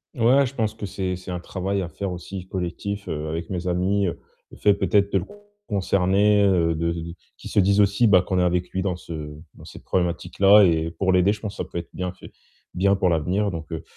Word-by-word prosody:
Ouais, 130 Hz, +4 st, +4 dB
je 130 Hz, -, -6 dB
pense 110 Hz, -4 st, -1 dB
que 110 Hz, -2 st, -7 dB
c'est 95 Hz, -1 st, -3 dB
c'est 90 Hz, 0 st, -8 dB
un 90 Hz, -, -3 dB
travail 95 Hz, +2 st, -3 dB
à 90 Hz, -, -4 dB
faire 95 Hz, +3 st, -5 dB
aussi 90 Hz, +1 st, -7 dB
collectif, 95 Hz, +2 st, -4 dB
heu, 75 Hz, 0 st, -4 dB
avec 80 Hz, +1 st, -4 dB
mes 90 Hz, -1 st, -4 dB
amis, 95 Hz, +3 st, +1 dB
heu, 85 Hz, -, -4 dB, 0.3 s
le -, -, -13 dB
fait 105 Hz, -, +4 dB
peut-être 100 Hz, 0 st, +1 dB
de 95 Hz, -, +4 dB
le 90 Hz, -, -6 dB, 0.4 s
concerner, 100 Hz, +1 st, +2 dB
heu, 85 Hz, -4 st, +2 dB
de 85 Hz, +1 st, -1 dB, 0.4 s
qu'il -, -, -9 dB
se 100 Hz, -, +3 dB
dise 100 Hz, +2 st, +3 dB
aussi, 100 Hz, +3 st, +4 dB
bah, 95 Hz, -4 st, +6 dB
qu'on 95 Hz, 0 st, -2 dB
est 90 Hz, -, +3 dB
avec 90 Hz, 0 st, 0 dB
lui 95 Hz, -, -2 dB
dans 90 Hz, -2 st, -2 dB
ce 85 Hz, -, -9 dB, 0.4 s
dans -, -, -16 dB
cette -, -, -12 dB
problématique 90 Hz, -2 st, -2 dB
là 100 Hz, +2 st, +8 dB
et 80 Hz, -3 st, +2 dB
pour 95 Hz, +2 st, 0 dB
l'aider. 90 Hz, +2 st, +4 dB
Je 105 Hz, -, -4 dB
pense 105 Hz, -1 st, -5 dB
que -, -, -3 dB
ça -, -, -12 dB
peut -, -, -6 dB
être 85 Hz, -, -5 dB
bien 90 Hz, -1 st, -3 dB
fait -, -, -14 dB, 0.4 s
bien 100 Hz, +2 st, +2 dB
pour 95 Hz, -1 st, +1 dB
l'avenir, 90 Hz, +5 st, 0 dB
donc 80 Hz, -1 st, -7 dB
heu, 80 Hz, -, -5 dB
95 Hz, 240 wpm, -23 LUFS, 90-100 Hz, 0.4 s, là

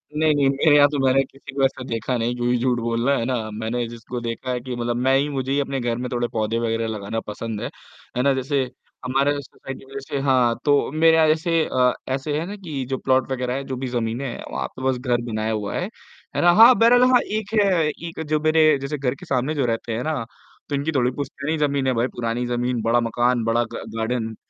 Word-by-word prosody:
नहीं, 155 Hz, 0 st, +3 dB
नहीं, 140 Hz, -1 st, +3 dB
मेरे 145 Hz, +2 st, +4 dB
यहाँ 145 Hz, -1 st, +7 dB
तो 145 Hz, -, -2 dB
मैंने 130 Hz, +1 st, +4 dB
किसी 135 Hz, +1 st, -12 dB
को 135 Hz, -, +1 dB
ऐसा 130 Hz, -1 st, -2 dB
देखा 115 Hz, +1 st, -2 dB
नहीं, 120 Hz, +1 st, -1 dB
क्यों 120 Hz, 0 st, -1 dB
ही 125 Hz, -, +3 dB
झूठ 125 Hz, 0 st, +1 dB
बोलना, 115 Hz, +4 st, +1 dB
है 115 Hz, -, -1 dB
ना? 115 Hz, -4 st, -2 dB
मैंने 110 Hz, +3 st, -2 dB
जिसको 120 Hz, +1 st, -7 dB
देखा 115 Hz, +2 st, -4 dB
है 125 Hz, -, -1 dB
कि 125 Hz, 0 st, -6 dB
मतलब 120 Hz, 0 st, -2 dB
मैं 130 Hz, +2 st, +3 dB
ही 140 Hz, -, +1 dB
मुझे 135 Hz, -2 st, -3 dB
ही 140 Hz, -, +2 dB
अपने 135 Hz, -1 st, -2 dB
घर 120 Hz, -2 st, -1 dB
में 125 Hz, +1 st, -4 dB
थोड़े 120 Hz, -1 st, 0 dB
पौधे 110 Hz, +1 st, 0 dB
वगैरह 115 Hz, -1 st, -1 dB
लगाना 110 Hz, 0 st, -3 dB
पसंद 105 Hz, 0 st, -5 dB
है, -, -, -2 dB, 0.5 s
है -, -, +2 dB
ना? 140 Hz, 0 st, +4 dB
जैसे, 135 Hz, +1 st, 0 dB, 0.4 s
हमारा 135 Hz, +3 st, +2 dB
जो 145 Hz, -, -2 dB
सोसाइटी 135 Hz, -1 st, -10 dB
में 135 Hz, -, -15 dB
जैसे 140 Hz, +1 st, -4 dB
हाँ, 125 Hz, -3 st, +3 dB
तो 145 Hz, -2 st, +3 dB
मेरे 160 Hz, +1 st, +5 dB
जैसे 165 Hz, +2 st, +2 dB
अ, 125 Hz, -1 st, +2 dB, 0.2 s
ऐसे 145 Hz, +2 st, -2 dB
है 165 Hz, -, -3 dB
ना 200 Hz, -, -6 dB
कि 160 Hz, -9 st, -5 dB
जो 135 Hz, -, -1 dB
प्लॉट 130 Hz, +1 st, +1 dB
वग़ैरह 125 Hz, -1 st, -1 dB
है, 135 Hz, -, -3 dB
जो 130 Hz, -, -5 dB
भी 130 Hz, +1 st, -3 dB
जमीनें 120 Hz, +1 st, -2 dB
है, 120 Hz, -, -6 dB
वहाँ -, -, -2 dB
पे 130 Hz, -, -9 dB
बस 130 Hz, -, 0 dB
घर 125 Hz, -2 st, 0 dB
बनाया 110 Hz, +1 st, -1 dB
हुआ 105 Hz, -2 st, -3 dB
है। 180 Hz, -, -1 dB, 0.5 s
है -, -, +1 dB
ना? 175 Hz, -, +6 dB
हाँ, 230 Hz, +6 st, +9 dB
बैरल 240 Hz, +2 st, +6 dB
हाँ 250 Hz, -, +6 dB, 0.2 s
एक 215 Hz, 0 st, -6 dB
है, 200 Hz, -, +3 dB, 0.2 s
एक 165 Hz, +1 st, -6 dB
जो 155 Hz, 0 st, +1 dB
मेरे 155 Hz, -1 st, +4 dB
जैसे 140 Hz, +2 st, -3 dB
घर 135 Hz, -2 st, -1 dB
के -, -, -12 dB
सामने 135 Hz, +3 st, 0 dB
जो 140 Hz, -3 st, +1 dB
रहते 115 Hz, 0 st, -2 dB
हैं 120 Hz, -, -2 dB
ना, 155 Hz, -6 st, -1 dB, 0.5 s
तो 145 Hz, -, 0 dB
इनकी 140 Hz, +3 st, -1 dB
थोड़ी 125 Hz, -4 st, +1 dB
पुश्तैनी 145 Hz, +3 st, -3 dB
ज़मीन 140 Hz, -3 st, 0 dB
है 130 Hz, -, +2 dB
भाई 120 Hz, +1 st, +1 dB
पुरानी 120 Hz, +1 st, -2 dB
जमीन, 120 Hz, -1 st, -1 dB
बड़ा 115 Hz, +2 st, +2 dB
मकान, 120 Hz, +1 st, +1 dB
बड़ा 115 Hz, +1 st, +2 dB
ग -, -, -5 dB, 0.2 s
गार्डन, 115 Hz, 0 st, -2 dB
130 Hz, 245 wpm, -22 LUFS, 120-145 Hz, 0.5 s, हाँ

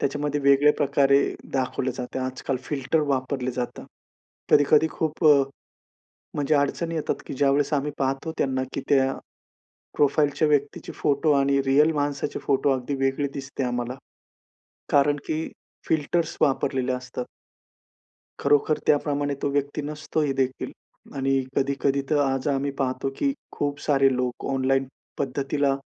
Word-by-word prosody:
त्याच्यामध्ये 145 Hz, +1 st, -1 dB
वेगळ्या 140 Hz, +1 st, +5 dB
प्रकारे 140 Hz, -1 st, +3 dB, 0.3 s
दाखवले 130 Hz, -1 st, -1 dB
जाते. 125 Hz, 0 st, -5 dB
आजकाल 130 Hz, +1 st, -3 dB
फिल्टर 145 Hz, +3 st, 0 dB
वापरले 130 Hz, -1 st, -1 dB
जातात. 125 Hz, -1 st, -4 dB, 0.7 s
कधी-कधी 145 Hz, +2 st, +5 dB
खूप 160 Hz, +1 st, -3 dB
अ, 145 Hz, -2 st, +7 dB, 0.9 s
म्हणजे 145 Hz, +1 st, +1 dB
अडचणी 150 Hz, +4 st, 0 dB
येतात 155 Hz, -, -2 dB
की -, -, -5 dB
ज्यावेळेस 140 Hz, +2 st, +2 dB
आम्ही 145 Hz, +1 st, 0 dB
पाहतो 135 Hz, +4 st, -1 dB
त्यांना 130 Hz, -1 st, 0 dB
की -, -, -2 dB
त्या 135 Hz, -1 st, +3 dB, 0.8 s
प्रोफाइलच्या 145 Hz, +1 st, +2 dB
व्यक्तीचे 145 Hz, -1 st, 0 dB
फोटो 145 Hz, +2 st, +1 dB
आणि 140 Hz, 0 st, +2 dB
रियल 150 Hz, +4 st, +4 dB
माणसाचे 145 Hz, -1 st, -2 dB
फोटो 140 Hz, 0 st, +2 dB
अगदी 130 Hz, +1 st, -1 dB
वेगळी 135 Hz, +2 st, 0 dB
दिसते 135 Hz, 0 st, -4 dB
आम्हाला, 120 Hz, 0 st, -2 dB, 1.0 s
कारण 145 Hz, +1 st, +4 dB
की 160 Hz, +1 st, -2 dB, 0.4 s
फिल्टर्स 160 Hz, +2 st, 0 dB
वापरलेले 135 Hz, -3 st, +1 dB
असतात. 125 Hz, 0 st, -5 dB, 1.2 s
खरोखर 145 Hz, +2 st, +3 dB
त्याप्रमाणे 145 Hz, -1 st, +1 dB
तो -, -, +1 dB
व्यक्ती 145 Hz, +1 st, -1 dB
नसतो 150 Hz, +1 st, -3 dB
ही 145 Hz, -2 st, +1 dB
देखील 130 Hz, -1 st, -1 dB, 0.5 s
आणि 135 Hz, 0 st, +1 dB
कधी-कधी 140 Hz, 0 st, +1 dB
तर 150 Hz, -, +3 dB
आज 135 Hz, 0 st, 0 dB
आम्ही 140 Hz, 0 st, 0 dB
पाहतो 130 Hz, 0 st, -1 dB
की 280 Hz, -, +1 dB, 0.2 s
खूप 145 Hz, -1 st, -2 dB
सारे 135 Hz, -2 st, +3 dB
लोक 125 Hz, -1 st, -3 dB
ऑनलाईन 135 Hz, 0 st, +1 dB, 0.3 s
पद्धतीला 140 Hz, +1 st, 0 dB
140 Hz, 130 wpm, -25 LUFS, 135-145 Hz, 1.2 s, अ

